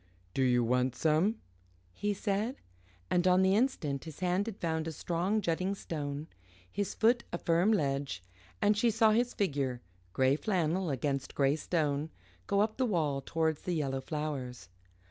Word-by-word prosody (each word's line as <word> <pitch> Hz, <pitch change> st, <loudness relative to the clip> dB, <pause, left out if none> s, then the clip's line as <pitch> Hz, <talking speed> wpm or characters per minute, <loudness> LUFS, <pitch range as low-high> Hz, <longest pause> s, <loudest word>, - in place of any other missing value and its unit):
"Do -, -, 0 dB
you 125 Hz, -2 st, +3 dB
want 125 Hz, +2 st, +1 dB
some?" 160 Hz, +8 st, +2 dB, 0.6 s
he 205 Hz, -, -1 dB
said, 205 Hz, +4 st, -1 dB, 0.6 s
and 180 Hz, +1 st, +3 dB
on 185 Hz, +1 st, +5 dB
the 190 Hz, 0 st, +4 dB
instant 175 Hz, -, 0 dB
his 160 Hz, -3 st, -9 dB
hand 185 Hz, +3 st, +1 dB
had 215 Hz, -3 st, -5 dB
found 160 Hz, -1 st, -1 dB
a -, -, -2 dB
strong 175 Hz, +7 st, -1 dB
jutting 185 Hz, +2 st, 0 dB
stone, 145 Hz, -5 st, -4 dB, 0.5 s
his 205 Hz, -1 st, -2 dB
foot 235 Hz, +2 st, +3 dB
a 175 Hz, -, -2 dB
firm 170 Hz, +5 st, +2 dB
ledge 140 Hz, -, 0 dB, 0.4 s
and 205 Hz, +1 st, +4 dB
she 230 Hz, +3 st, +3 dB
saw 220 Hz, 0 st, +4 dB
his 240 Hz, +3 st, +1 dB
figure, 140 Hz, -10 st, -1 dB, 0.3 s
grey 130 Hz, +6 st, +3 dB
flannel 180 Hz, -2 st, 0 dB
against 140 Hz, 0 st, -2 dB
grey 140 Hz, 0 st, +3 dB
stone, 155 Hz, -2 st, -1 dB, 0.4 s
go 200 Hz, 0 st, +2 dB
up 215 Hz, +1 st, 0 dB
the 260 Hz, -, +2 dB
wall 155 Hz, -9 st, 0 dB
towards 160 Hz, -2 st, 0 dB
the 180 Hz, -, -2 dB
yellow 135 Hz, -4 st, -1 dB
flowers. 130 Hz, -, -4 dB
165 Hz, 165 wpm, -31 LUFS, 140-200 Hz, 0.6 s, on